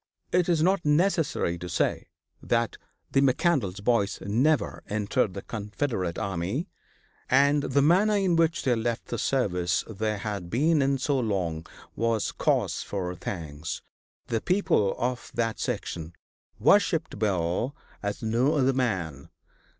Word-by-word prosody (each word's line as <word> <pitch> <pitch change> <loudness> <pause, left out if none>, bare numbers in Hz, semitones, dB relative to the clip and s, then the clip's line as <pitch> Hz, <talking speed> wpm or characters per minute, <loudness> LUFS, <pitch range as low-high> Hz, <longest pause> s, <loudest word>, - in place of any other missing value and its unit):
It 180 0 +2
is 165 -3 +3
not 190 0 +2
necessary 150 - +1
to 90 +1 -6
say - - 0 0.3
that - - 0 0.4
the 135 - +3
McCandlas 130 - +1
boys 110 -4 +1
never 130 +10 +1
entered 105 0 0
the 100 - -6
Confederate 105 -4 -3
army, 100 - -2 0.6
and 140 +2 +4
the 140 0 +2
manner 195 +7 +4
in 190 -4 +2
which 165 -1 +2
they 130 - +3
left 115 0 -2
the 120 - -3
service 90 -11 +1
they 110 0 -2
had 100 -3 -4
been 150 - +3
in 135 0 +2
so 135 +1 0
long 90 -8 -2 0.3
was 115 -1 0
cause - - 0
for 90 -3 -3
thanks. 80 -3 -5 0.4
The 115 -1 -1
people 180 - +2
of 125 0 -2
that 115 -1 -1
section 80 0 -3 0.4
worshiped - - +3
Bill 100 - 0 0.3
as 100 +1 -4
no 120 +7 +2
other 135 -2 +3
man. 90 - -2
115 Hz, 135 wpm, -27 LUFS, 95-140 Hz, 0.6 s, and